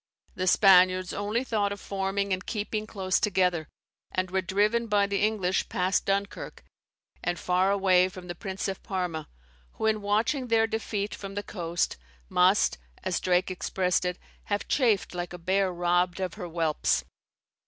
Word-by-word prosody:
The 185 0 -2
Spaniards 185 -1 +5
only 210 +4 -1
thought 210 -5 0
of 200 - -5
forming 195 0 -1
and 185 +1 -2
keeping 215 0 -3
close 190 -3 0
together, 180 -5 +1 0.4
and 185 -1 -2
were 190 0 +1
driven 210 +5 +1
by 205 -2 +3
the 200 0 -1
English 205 -3 +1
past 185 +1 0
Dunkirk, 200 +1 -2 0.6
and 175 0 -1
far 180 +2 +1
away 185 -2 +4
from 185 -1 -10
the 175 - -4
Prince 190 +1 -4
of 195 -1 -4
Parma, 180 -6 -3 0.4
who - - -4
in 215 -1 +2
watching 220 +6 0
their 225 -1 +4
defeat 215 -2 -3
from 195 -1 -7
the 205 - -3
coast, 175 -4 -2 0.3
must, 180 - +3 0.2
as 185 - 0
Drake 185 +1 +1
expressed 180 0 0
it, 180 0 -2 0.3
have 205 0 -2
chafed 225 -10 +2
like 175 0 -4
a - - -6
bear 190 +2 +1
robbed 175 +1 +1
of 185 -3 -2
her 180 -4 -6
whelps. 165 -2 0
190 Hz, 165 wpm, -27 LUFS, 180-205 Hz, 0.6 s, Spaniards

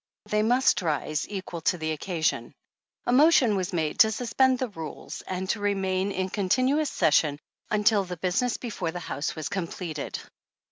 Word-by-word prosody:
They 210 0 +1
must 245 +2 +3
rise 155 -2 -1
equal 185 -4 -5
to 180 - +1
the 160 -1 -2
occasion. 160 +1 -2 0.5
A - - +1
motion 265 -5 +5
was 185 -2 -2
made 160 -4 -2
to 220 - +8
suspend 255 +3 +2
the 255 -1 -2
rules, 165 -6 -7
and 185 0 -3
to - - -3
re 205 0 +1
^ - - -4
main 190 +1 0
in 185 -1 -2
continuous 255 +9 +1
session 150 -1 +2 0.3
until 210 -1 +3
the 180 -1 -6
business 190 +8 0
before 210 -8 -4
the 175 +2 -5
House 160 -3 -4
was 155 -2 -4
completed. 170 -5 -4
190 Hz, 175 wpm, -26 LUFS, 165-220 Hz, 0.5 s, to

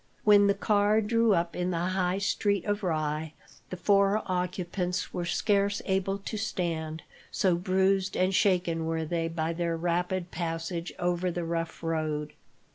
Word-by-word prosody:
When 205 -1 +6
the 200 - +3
car 205 +1 +3
drew 225 -1 +3
up 170 0 -1
in 180 0 -1
the 175 - -1 0.2
High 185 0 +1
Street 200 -1 0
of 205 0 -1
Rye, 155 -3 -2 0.4
the 185 - -5
four 200 +2 +3
occupants 180 0 -2
were 175 - -2
scarce 200 +2 +1
able 195 0 0
to 200 +2 -6
stand, 165 -6 -3 0.3
so 190 -3 +2
bruised 190 +2 +1
and 185 +1 +2
shaken 180 -5 +2
were 160 0 -1
they 165 +1 -1
by 165 0 -2
their 170 -1 -1
rapid 175 +1 -1
passage 165 0 -3
over 175 +1 0
the 175 0 -3
rough 165 0 -3
road. 155 -2 -2
180 Hz, 155 wpm, -28 LUFS, 165-200 Hz, 0.4 s, When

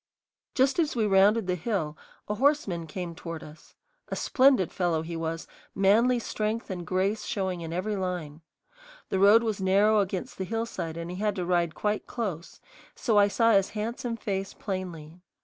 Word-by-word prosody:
Just 270 +4 +3
as 310 -5 +1
we 225 -3 +2
rounded 205 +2 +4
the 180 - 0
hill 180 -4 -2 0.3
a 210 - -1
horseman 210 - +1
came 175 +1 -5
toward 165 -1 -7
us. 150 0 -14 0.3
A - - -2
splendid 260 - +3
fellow 170 -3 0
he 170 +1 -6
was, 165 0 -3 0.3
manly 225 +6 +4
strength 220 -1 -3
and 175 -3 -5
grace 190 +4 0
showing 190 -5 -2
in 165 -1 -6
every 190 +5 -2
line. 175 -5 -4 0.7
The 190 - 0
road 205 +4 +7
was 215 -4 -2
narrow 200 +3 +4
against 190 -2 -3
the - - -1
hillside 215 -6 -3
and 170 +1 -5
he 180 - -6
had 210 0 0
to 180 -3 -2
ride 170 -2 +1
quite 210 0 -1
close, 190 -9 -5 0.4
so 220 -4 +2
I 205 - +6
saw 230 +3 +3
his 195 -2 +4
handsome 230 +2 -3
face 195 -3 -3
plainly. 180 -4 -6
195 Hz, 175 wpm, -27 LUFS, 175-215 Hz, 0.7 s, road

